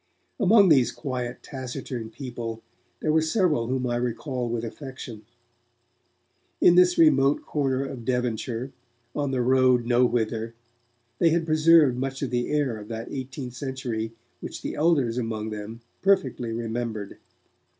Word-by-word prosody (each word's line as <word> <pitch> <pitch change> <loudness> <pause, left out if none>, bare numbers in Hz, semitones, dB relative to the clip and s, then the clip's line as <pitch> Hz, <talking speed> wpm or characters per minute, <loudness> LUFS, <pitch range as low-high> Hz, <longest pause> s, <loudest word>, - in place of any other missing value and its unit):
Among 205 -2 +6
these 130 -6 +5
quiet, 125 -4 -5
taciturn 130 -3 -6
people, 115 -2 -6 0.4
there 155 - +1
were 160 - +4
several 160 - +1
whom 130 0 -1
I 120 -1 0
recall 125 +1 -2
with 120 0 -2
affection. 120 -3 -8 1.3
In 175 - +6
this 180 0 +5
remote 145 -3 +4
corner 135 -2 0
of 135 -3 -7
Devonshire, 125 +1 -2 0.4
on 145 -2 -1
the 130 -2 0
road 130 -1 +4
nowhither, 115 -2 +1 0.6
they 170 - +5
had 165 0 +1
preserved 155 -4 +5
much 135 +1 -3
of 130 - -2
the 120 0 -1
air 145 -6 0
of 105 -1 -10
that 115 0 -6
eighteenth 130 -1 -6
century 125 -4 -4 0.3
which - - -7
the - - -3
elders 140 -7 +2
among 110 -2 -3
them 105 +2 -7 0.2
perfectly 130 -11 +1
remembered. 115 -2 -4
125 Hz, 140 wpm, -25 LUFS, 115-140 Hz, 1.3 s, Among